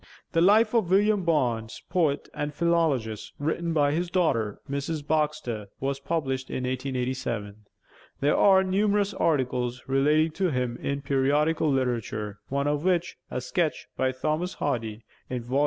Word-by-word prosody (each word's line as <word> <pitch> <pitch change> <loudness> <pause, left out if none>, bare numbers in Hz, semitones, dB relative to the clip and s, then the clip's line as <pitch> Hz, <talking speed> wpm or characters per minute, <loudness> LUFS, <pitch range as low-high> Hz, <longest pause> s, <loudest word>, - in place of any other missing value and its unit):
'The 165 - +2
Life 215 +5 +5
of 220 -7 +2
William 205 +1 +3
Barnes, 120 -9 0
Poet 155 -5 +1
and 145 0 -4
Philologist,' 155 -11 0
written 165 +3 -1
by 145 -3 +3
his 170 +3 -1
daughter, 115 - +1
Mrs. 140 +2 -3
Baxter, 150 -9 -1
was 135 0 -2
published 135 -4 -2
in 130 - -3
1887. 125 -5 -3 0.5
There 145 +2 +2
are 190 -1 +6
numerous 200 +1 +1
articles 125 -4 0
relating 150 +4 +3
to 185 +3 0
him 125 -4 -1
in 140 0 -3
periodical 145 +3 +2
literature, 115 -5 -2
one 140 +1 0
of 145 0 0
which, 180 -1 +1
a - - -2
sketch 155 +5 -1
by 130 0 +1
Thomas 155 +7 -2
Hardy, 115 -6 -2 0.3
in 125 -2 -3
Vol. 130 +4 0
145 Hz, 145 wpm, -27 LUFS, 125-170 Hz, 0.5 s, are